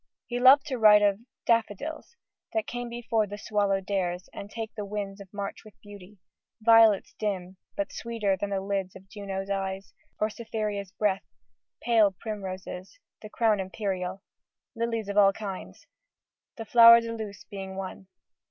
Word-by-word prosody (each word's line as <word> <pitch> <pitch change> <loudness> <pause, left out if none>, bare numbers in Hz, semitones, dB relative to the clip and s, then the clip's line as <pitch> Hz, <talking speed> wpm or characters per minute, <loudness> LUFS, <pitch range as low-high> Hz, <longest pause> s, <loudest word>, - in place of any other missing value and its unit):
He 245 0 -3
loved 265 +3 +7
to 260 -4 -3
write 210 -1 +7
of 200 -1 +3 0.3
Daffodils, 230 - -1 0.4
That 220 -1 0
come 245 0 -5
before 230 -2 -1
the 205 +1 -7
swallow 205 -2 0
dares, 185 -2 -2
and 200 - -8
take 225 0 -6
The 210 - -5
winds 200 -1 -5
of 195 - -13
March 200 -1 -5
with 215 - -17
beauty; 205 -1 -13 0.4
violets 225 -2 +5
dim, 190 -3 -3 0.2
But 200 0 -2
sweeter 225 -4 -1
than 200 +2 -4
the 195 -1 -1
lids 195 -1 -3
of 190 0 -13
Juno's 195 -1 -5
eyes, 195 0 -3 0.3
Or 215 +1 +1
Cytherea's 210 -4 -4
breath: 200 -2 0 0.6
pale 225 -4 +5
primroses.... 190 - -6 0.2
The 215 - -9
crown 220 -2 +2
imperial, 190 -1 -3 0.5
lilies 230 -2 -2
of 200 0 -4
all 195 -1 +6
kinds, 195 -3 -7 0.7
The 225 - -6
flower 230 +1 +9
de 230 0 -5
luce 210 -2 -7
being 195 -2 -8
one. 190 0 -7
205 Hz, 155 wpm, -27 LUFS, 195-225 Hz, 0.7 s, flower